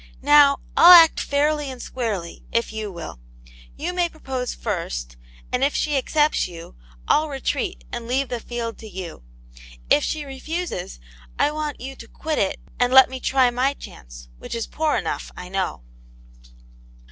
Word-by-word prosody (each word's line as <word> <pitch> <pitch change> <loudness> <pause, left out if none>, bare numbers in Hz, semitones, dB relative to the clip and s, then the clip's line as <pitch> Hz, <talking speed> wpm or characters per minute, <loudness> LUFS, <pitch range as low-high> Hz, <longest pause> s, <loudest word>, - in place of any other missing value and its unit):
Now, 285 -1 +6 0.2
I'll 350 +2 +10
act 330 -2 +8
fairly 295 0 0
and 260 -1 -8
squarely, 215 -10 -4
if 230 -1 0
you 215 -2 -4
will. 170 - -8 0.6
You 345 +4 -3
may 350 -1 +1
propose 265 -6 -5
first, - - -4 0.4
and 250 +1 0
if 280 - +1
she 300 -1 0
accepts 300 +3 +1
you, 165 - -11 0.3
I'll 310 +1 +3
retreat, 355 - -3
and 235 -1 -5
leave 260 +2 0
the 245 - -3
field 230 0 -5
to 220 - -10
you. 185 - -8 0.7
If 150 - +5
she 300 -2 -2
refuses, 275 - -5 0.4
I 295 - +2
want 300 -1 -4
you 270 +2 -7
to 230 - -11
quit 310 +5 -3
it, 195 - 0 0.2
and 245 0 +2
let 265 0 +8
me 260 - -5
try 260 -1 +3
my 260 +3 0
chance, - - -12
which - - -6
is 230 - -2
poor 315 -1 -1
enough, - - -4
I 180 - -8
know." 190 - -3
260 Hz, 165 wpm, -23 LUFS, 215-295 Hz, 0.7 s, I'll